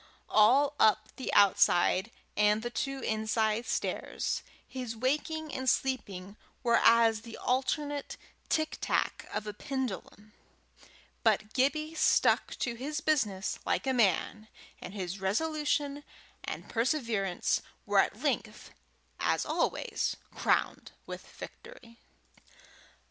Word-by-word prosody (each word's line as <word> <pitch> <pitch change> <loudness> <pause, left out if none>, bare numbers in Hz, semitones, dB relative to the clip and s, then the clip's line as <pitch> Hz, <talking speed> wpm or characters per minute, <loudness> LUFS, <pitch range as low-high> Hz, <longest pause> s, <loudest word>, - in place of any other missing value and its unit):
All 270 +7 +5
up 215 0 +4
the 260 - -3
outside 190 0 +4 0.3
and 210 +1 +3
the 240 - -3
two 275 +2 -3
inside 220 +1 0
stairs, - - -2 0.3
his 250 -3 -5
waking 300 +5 -1
and 260 -1 0
sleeping 200 -7 -2 0.3
were 235 -2 +4
as 230 -1 +5
the 230 -1 -10
alternate 285 +3 -1 0.3
tictac 315 0 0
of 210 0 -3
a 210 - -5
pendulum; 215 -4 -5 0.9
but 215 0 +1
Gibbie 305 +4 +1
stuck 320 - +3
to 240 - -2
his 285 +6 -4
business 215 -12 0
like - - 0
a 265 - +1
man, 215 -1 +1 0.3
and 185 - -8
his 190 -1 -4
resolution 290 +6 0 0.4
and - - -6
perseverance 230 - 0 0.2
were - - +3
at - - +1
length, - - -2 0.5
as - - +1
always, - - -1 0.2
crowned - - 0
with - - -8
victory. 245 - -12
235 Hz, 110 wpm, -30 LUFS, 210-280 Hz, 0.9 s, All